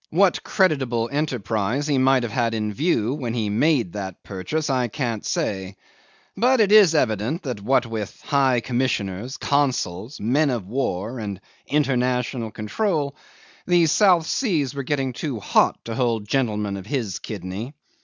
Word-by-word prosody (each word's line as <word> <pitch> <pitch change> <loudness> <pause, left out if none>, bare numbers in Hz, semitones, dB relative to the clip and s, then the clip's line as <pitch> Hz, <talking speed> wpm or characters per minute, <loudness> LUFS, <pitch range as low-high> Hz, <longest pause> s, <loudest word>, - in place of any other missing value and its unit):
What 185 +2 +3
creditable 130 - +1
enterprise 125 -3 -1
he 145 -3 +1
might 130 -1 +4
have 120 - -3
had 115 -3 0
in 105 -1 -2
view 130 - +1
when 125 -5 -3
he 110 -3 -1
made 120 - +2
that 95 -3 -6
purchase 125 +11 -3
I 130 -3 +1
can't 115 -3 -3
say, 95 -1 -2 0.6
but 255 +2 +3
it 210 -2 +4
is 205 -6 +7
evident 120 - 0
that 125 -8 -4
what 125 +4 +2
with 110 -3 -5
High 135 -4 +2
Commissioners, 120 -2 -2
consuls, 130 -5 -1
men 140 +8 +2
of 120 -7 -2
war, 120 -1 -2
and 100 -3 -5 0.3
international 125 -4 0
control, 145 - -2 0.5
the 175 -2 +4
South 175 0 +4
Seas 160 - 0
were 140 - -3
getting 135 -1 -1
too 130 -2 -4
hot - - +2
to 115 - -4
hold 115 -3 0
gentlemen 105 -6 0
of 95 0 -9
his 115 -8 -2
kidney. 105 - -6
125 Hz, 155 wpm, -23 LUFS, 110-145 Hz, 0.6 s, is